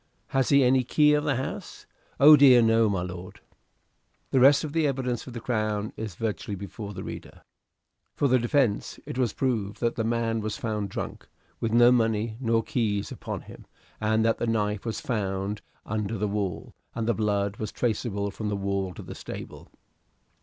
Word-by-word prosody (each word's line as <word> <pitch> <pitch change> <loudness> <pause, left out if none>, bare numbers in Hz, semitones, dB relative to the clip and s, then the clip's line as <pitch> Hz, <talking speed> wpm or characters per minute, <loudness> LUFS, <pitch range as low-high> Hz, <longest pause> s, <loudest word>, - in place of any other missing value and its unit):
"Has 135 -1 +1
he 140 -1 +5
any 130 +1 +4
key 150 +4 +4
of 150 0 +1
the 145 -2 +1
house?" 130 +2 -6 0.3
"Oh, 150 +3 +10
dear, 130 -4 +7
no, 115 -1 +4
my 95 -3 -1
lord." 90 0 -8 0.9
The 130 - +3
rest 140 +4 +6
of 150 -2 -5
the 160 -2 +2
evidence 125 -4 -2
for - - -10
the 120 -1 -6
Crown 110 -3 -2
is 110 -5 -6
virtually 105 0 -3
before 100 +1 -7
the - - -6
reader. - - -9 0.7
For 145 - +2
the 130 -1 +4
defence 120 -3 0
it 130 - -5
was 120 -4 +2
proved 110 -6 -2
that 120 -1 0
the 115 - 0
man 115 0 0
was 110 -1 -3
found 105 -3 -3
drunk, - - -6 0.3
with 115 - -1
no 120 +1 +6
money 115 -2 +1
nor 115 -3 +1
keys 105 -5 -1
upon - - -5
him, - - -13 0.3
and 110 +1 +1
that 115 - +1
the 120 - -1
knife 105 -2 -1
was 115 - -3
found 100 -2 -2 0.2
under 110 +1 -2
the 105 +2 -1
wall, 100 -3 -3 0.2
and 115 -1 -2
the 115 - +3
blood 100 -2 -1
was 110 - -4
traceable 105 -4 -2
from 105 +1 -4
the 105 - -1
wall 100 -2 -2
to - - -8
the - - -8
stable. - - -9
115 Hz, 190 wpm, -26 LUFS, 105-125 Hz, 0.9 s, Oh